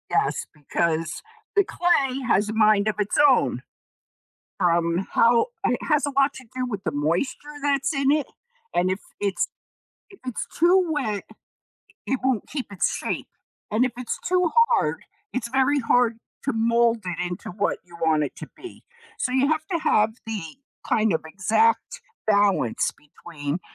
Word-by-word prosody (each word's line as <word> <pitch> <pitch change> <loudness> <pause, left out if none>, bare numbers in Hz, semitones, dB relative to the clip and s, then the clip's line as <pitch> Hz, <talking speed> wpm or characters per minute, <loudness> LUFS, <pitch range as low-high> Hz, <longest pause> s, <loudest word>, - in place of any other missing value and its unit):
Yes, - - +1
because 160 +2 -1 0.3
the 400 - +5
clay 275 -9 +1
has 205 -2 +2
a - - -2
mind 215 -1 +4
of 215 - +1
its 205 -1 0
own, 265 - +2 1.0
from 170 0 +1
how 235 - +4 0.2
it - - +1
has 300 -2 +3
a 285 - -2
lot 275 +1 +3
to 260 - -11
do 255 0 -1
with 205 -5 -5
the 160 - -1
moisture 170 - -2
that's 285 +2 +1
in 275 -1 +2
it, 300 -1 +1 0.5
and 180 +1 +2
if 190 - -2 0.2
it's 205 - 0 0.6
if 390 - -15
it's 250 - -3
too 355 +2 +4
wet, 220 -10 -1 0.8
it 265 - 0
won't 260 -4 0
keep 275 -4 -4
its 200 -3 0
shape - - -3 0.4
and 220 +4 +3
if 250 - -4
it's 250 -1 -4
too 360 -2 +2 0.2
hard, 485 - +1 0.3
it's 235 -2 -2
very 265 +3 +2
hard 235 -2 +2 0.3
to 275 - 0
mold 235 0 +3
it 180 -2 -3
into 175 0 -6
what 200 +3 -1
you 170 -1 -13
want 160 -2 +3
it 145 - -4
to 155 - -8
be. 365 - -11 0.4
So, 255 - -1
you 265 +2 +3
have 315 0 0
to 340 - +2
have 215 -8 +3 0.2
the, 220 -2 -3 0.5
kind 220 -3 +2
of, 160 - -1
exact 215 - +1 0.2
balance 200 - +2
between 150 +1 -6
230 Hz, 165 wpm, -24 LUFS, 185-275 Hz, 1.0 s, the